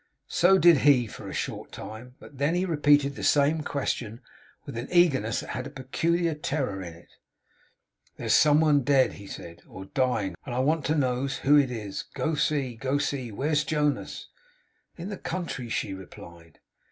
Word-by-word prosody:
So 190 +3 +5
did 170 -4 +6
he 135 -4 +4
for 110 - -9
a - - -6
short - - -5
time; 120 +4 -9
but 140 - -14
then 145 +4 +1
he 180 +1 +1
repeated 145 -4 +3
the - - -8
same 150 +2 +3
question 120 -6 -3 0.5
with - - -8
an 120 +3 -4
eagerness 145 -11 +3
that - - -10
had 130 +1 -4
a - - -8
peculiar 165 +5 -1
terror 135 -9 -3
in 85 -3 -8
it. 85 - -20 1.0
'There's - - 0
some 150 0 +5
one 150 -3 +4
dead,' 135 0 +3
he 100 - -11
said, 85 -2 -9
'or 95 +1 -10
dying; 115 -5 0
and 120 - -5
I - - 0
want 150 +3 +1
to 155 - +1
knows 135 -1 0
who 145 +2 +6
it 140 -3 +4
is. 105 -5 -5
Go 160 - -1
see, 145 -4 0
go 135 +4 -1
see! 140 -4 -2
Where's 150 +7 0
Jonas?' 150 -2 -2 0.7
'In 180 +3 -6
the 200 - -5
country,' 165 -9 -4
she 100 - -2
replied. 85 -3 -12
140 Hz, 180 wpm, -27 LUFS, 120-150 Hz, 1.0 s, did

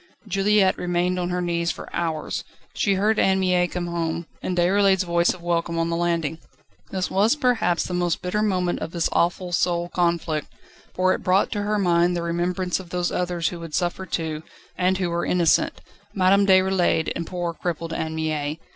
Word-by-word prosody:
Juliette 195 0 +2
remained 180 +1 0
on 175 0 -2
her 180 0 -1
knees 170 -1 0
for - - -5
hours. 160 -2 -2 0.3
She 200 -2 +1
heard 210 +3 +2
Anne 190 0 +3
Mie 180 -1 +2
come 175 0 -4
home, 170 -1 -2 0.2
and 180 - -3
Déroulède's 190 +2 +3
voice 170 -1 +2
of 180 - -9
welcome 170 -1 -1
on 165 0 0
the - - 0
landing. 170 -2 -1 0.5
This 185 -1 -2
was 210 +7 +3
perhaps 235 - +1
the 180 - -5
most 175 -2 0
bitter 180 +4 -1
moment 185 -4 0
of 160 - -6
this 170 -2 0
awful 175 +1 0
soul 175 0 0
conflict, 170 -4 0 0.5
for 185 0 +3
it - - -4
brought 185 +2 +2
to 205 - -1
her 210 +1 0
mind 175 -2 +2
the 170 - -2
remembrance 175 +2 -1
of 185 -2 -10
those 180 0 -1
others 175 -2 -1
who 175 - -7
would 165 -2 -6
suffer 180 +2 -1
too, 160 -3 -3 0.3
and 185 +1 +1
who 180 -2 -1
were 170 0 -1
innocent 175 -3 +2 0.3
Madame 195 +1 +4
Déroulède 185 -3 +3
and 170 -1 -4
poor, 175 -2 -3
crippled 165 -1 -4
Anne 160 0 -3
Mie. 155 -1 -2
175 Hz, 190 wpm, -23 LUFS, 170-185 Hz, 0.5 s, Madame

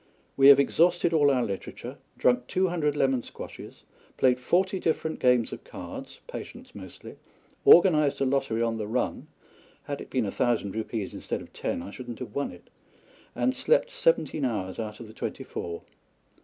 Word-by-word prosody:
We 135 0 +6
have 140 0 +9
exhausted 170 +4 +3
all 145 -3 +5
our 130 -3 +2
literature, 100 -3 -6 0.2
drunk 125 0 +2
two 185 0 +1
hundred 150 -4 0
lemon 135 -3 +2
squashes; - - -10 0.3
played 125 -1 +3
forty 185 +8 +1
different 160 -1 -1
games 125 -2 +3
of - - -8
cards - - -9
(Patience - - -9
mostly), 95 -3 -10 0.5
organised 155 -5 +6
a 135 - +2
lottery 130 -4 0
on 115 -1 -1
the 105 -2 -4
run 110 - -2 0.6
(had 145 -1 -5
it - - -10
been 125 -4 0
a 100 - -2
thousand 115 -5 0
rupees 110 -2 -4
instead - - -4
of - - -17
ten 85 - -3
I 100 - -8
should 125 +3 -9
not 120 - -6
have - - -8
won 140 - -2
it), 90 - -16 0.6
and 125 +1 +1
slept - - +2
seventeen - - +1
hours 105 -7 -2
out 105 -1 -5
of 120 - -8
the 110 - -13
twenty - - -5
four. 85 0 -6
130 Hz, 180 wpm, -27 LUFS, 110-155 Hz, 0.6 s, have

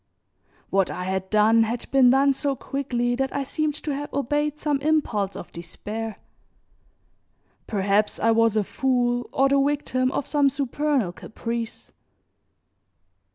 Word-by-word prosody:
What 195 -1 +2
I 180 - -4
had 190 0 -2
done 215 +2 +4
had 225 +2 -1
been 265 -2 +6
done 275 +2 +4
so 275 0 -1
quickly 245 -3 -2
that 270 0 -1
I 280 - 0
seemed 300 +2 -1
to 300 - -2
have 290 +1 -5
obeyed 295 +2 -1
some 290 -2 -1
impulse 275 -10 0
of - - -8
despair. 210 +6 -6 1.5
Perhaps 205 0 +1
I 230 - +3
was 225 -1 +3
a 215 - +3
fool 245 +1 0
or 270 - +3
the 275 0 +3
victim 275 -2 0
of 285 - -2
some 285 -2 +3
supernal 275 -5 0
caprice. 230 +4 -6
250 Hz, 140 wpm, -24 LUFS, 220-280 Hz, 1.5 s, been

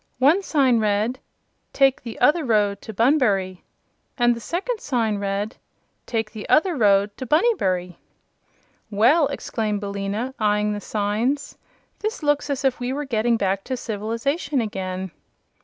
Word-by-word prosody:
One 290 +9 +4
sign 270 -10 +2
read: 215 +4 0 0.5
TAKE 270 -1 +3
THE 230 -2 -8
OTHER 300 +6 +4
ROAD 210 -5 +1
TO - - -8
BUNBURY 210 -6 +2 0.6
and 240 -1 +3
the - - -7
second 390 - -3
sign 225 -6 0
read: 200 +2 -3 0.5
TAKE 225 -2 -2
THE 215 -2 -8
OTHER 345 +2 +3
ROAD 205 -4 +3
TO 260 - -6
BUNNYBURY 190 - +1 0.9
"Well!" 250 +9 +4
exclaimed 220 -6 -3
Billina, 200 +5 -3
eyeing 210 -1 +1
the 205 - -5
signs, 215 +8 -1 0.4
"this 430 -4 -4
looks 290 0 +1
as 275 0 -2
if 265 -2 +1
we 245 +1 -2
were 290 +2 -3
getting 235 -2 +1
back 195 -1 -1
to 260 0 -3
civilization 240 - -2
again." 190 -4 -4
230 Hz, 140 wpm, -23 LUFS, 205-275 Hz, 0.9 s, One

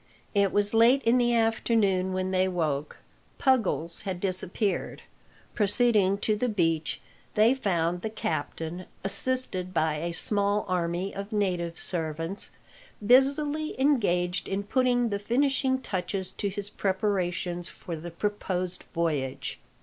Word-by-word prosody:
It 200 -2 +3
was 205 +1 +1
late 235 +5 +5
in 235 +2 +4
the 240 -1 +3
afternoon 220 -4 +2
when 185 0 -1
they 185 0 +2
woke. 155 -5 -2 0.4
Puggles 220 - +1
had 190 -3 -4
disappeared. 190 +2 -2 0.5
Proceeding 205 -2 +3
to 215 - +2
the 245 +4 0
beach, 165 -6 0 0.4
they 220 +4 +5
found 175 -8 0
the 220 - -3
captain, 175 -4 -4 0.2
assisted 195 -3 0
by 155 -1 +1
a 170 +3 -3
small 205 +4 0
army 180 +1 -1
of 200 +2 -6
native 180 -5 -1
servants, 165 +2 -1 0.6
busily 285 +5 +3
engaged 190 -11 +1
in 195 +1 -2
putting 245 +1 +2
the 200 -1 -2
finishing 260 +4 +1
touches 190 -4 -3
to 200 - -3
his 205 +1 -4
preparations 185 -3 -1
for 170 - -7
the 165 +2 -7
proposed 185 -1 -3
voyage. 150 -6 -2
195 Hz, 125 wpm, -27 LUFS, 175-225 Hz, 0.6 s, late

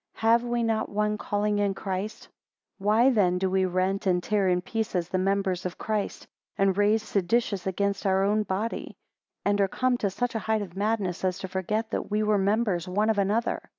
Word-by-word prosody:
Have 230 +1 +3
we 240 -1 -1
not 225 -1 0
one 210 +1 0
calling 205 0 0
in 200 -1 +1
Christ. 195 +2 -4
17 - - -21 0.4
Why 215 +6 +4
then 185 -6 +2
do 190 0 0
we 190 0 +2
rent 185 +2 0
and 180 -1 +2
tear 205 -3 +1
in 180 0 +2
pieces 185 -3 -2
the 185 - 0
members 195 -1 0
of 180 -1 -5
Christ; 215 -2 -3 0.3
and 195 -1 +3
raise 210 +2 +3
seditious 200 -1 0
against 200 +1 -1
our 190 0 +3
own 210 +2 +2
body? 210 +3 -3 0.5
And 205 0 +2
are 195 - +3
come 255 +5 0
to 200 - 0
such 245 +6 -2
a 225 - -1
height 220 +1 0
of 180 -3 -10
madness, 200 -3 -1
as 185 -1 0
to 190 - -5
forget 210 +4 -2
that - - -3
we 210 +1 +1
were 210 -1 +2
members 200 -3 +1
one 210 +4 +2
of 210 - -1
another? 210 +4 0
200 Hz, 205 wpm, -27 LUFS, 190-215 Hz, 0.5 s, Why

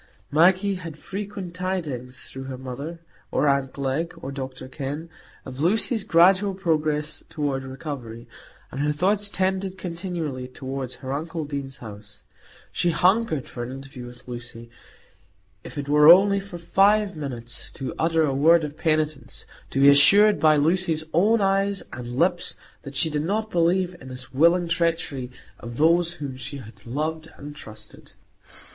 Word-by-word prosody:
Maggie 185 +6 +4
had 165 -3 -8
frequent 195 0 -6
tidings 160 -9 -4
through 135 0 -8
her 130 -1 -6
mother, 140 +6 -7 0.3
or 150 - +1
aunt 140 -1 +2
Glegg, 140 +5 -2
or 135 - -6
Dr 130 -2 -6
Kenn, 145 +4 -5 0.3
of 130 0 -8
Lucy's 215 - +2
gradual 190 +1 +4
progress 155 -4 -1
toward 140 -3 -2
recovery, 130 -4 -7 0.4
and 135 - -4
her 150 +1 +2
thoughts 200 +6 +1
tended 190 0 -1
continually 170 -7 -4
toward 130 0 -5
her 130 0 -6
uncle 160 +2 -3
Deane's 140 -2 -5
house; 105 -2 -12 0.5
she 175 - +1
hungered 180 - +2
for 120 - -8
an 120 +1 -5
interview 135 -2 -9
with 120 +1 -13
Lucy, 120 -1 -8 0.9
if - - -10
it 145 -1 -4
were 150 +2 +8
only 200 +2 +6
for 195 -2 -8
five 200 +3 +3
minutes, 120 -6 -6
to 135 - -6
utter 165 0 +2
a 140 -3 +1
word 160 +4 +5
of 150 -1 -5
penitence, 155 -1 -1 0.2
to 135 - -2
be 140 - +7
assured 200 +9 +7
by 155 -1 +5
Lucy's 160 +1 +1
own 210 +6 +4
eyes 195 0 +1
and 120 0 -6
lips 175 +3 +1 0.3
that 140 -1 -9
she 160 +3 +1
did 150 0 0
not 215 +5 -1
believe 175 +1 +2
in 130 - -11
the 130 0 -6
willing 170 +5 +4
treachery 165 -6 -1 0.3
of 120 0 -8
those 170 +2 +3
whom 145 -6 -6
she 140 +2 -7
had 115 -2 -13
loved 155 +5 -3
and 145 +1 -9
trusted. 110 -6 -12
155 Hz, 155 wpm, -24 LUFS, 135-180 Hz, 0.9 s, were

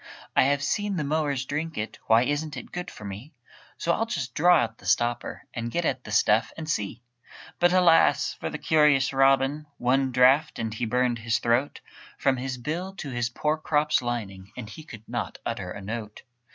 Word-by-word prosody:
"I - - +5
have 140 +1 +1
seen 205 +2 -1
the 160 - -1
mowers 145 -3 -1
drink 155 +4 -4
it 110 +1 -4
Why 115 +1 +5
isn't 145 +1 -2
it - - -9
good 180 0 -5
for 105 - -11
me? 105 - -8 0.4
So 170 - 0
I'll 225 - -1
just 135 - -3
draw 175 +3 +5
out 115 0 -4
the - - -11
stopper 120 0 0
And 115 -1 -3
get 170 +7 -1
at 130 - -1
the - - -8
stuff, 105 +3 +3
and 160 -1 -6
see!" 120 -4 -3 0.6
But 175 0 +4
alas! 180 -3 +4
for - - -3
the - - -5
curious 150 -4 +3
Robin, 135 +2 +3
One 130 +2 +1
draught, 130 +5 +4
and 110 -1 -3
he 115 +1 -2
burned 125 0 +1
his 115 0 0
throat 120 +5 0 0.4
From 135 -1 +2
his 130 0 -4
bill 170 +9 -4
to 150 -7 -6
his 120 -1 -1
poor 150 +5 -1
crop's 150 -1 +1
lining, 100 -6 -5
And 120 -4 -6
he 155 - -9
could 115 -7 -12
not 120 0 -4
utter 100 -6 -3
a 100 - -7
note. 105 +1 -6
135 Hz, 200 wpm, -26 LUFS, 115-155 Hz, 0.6 s, I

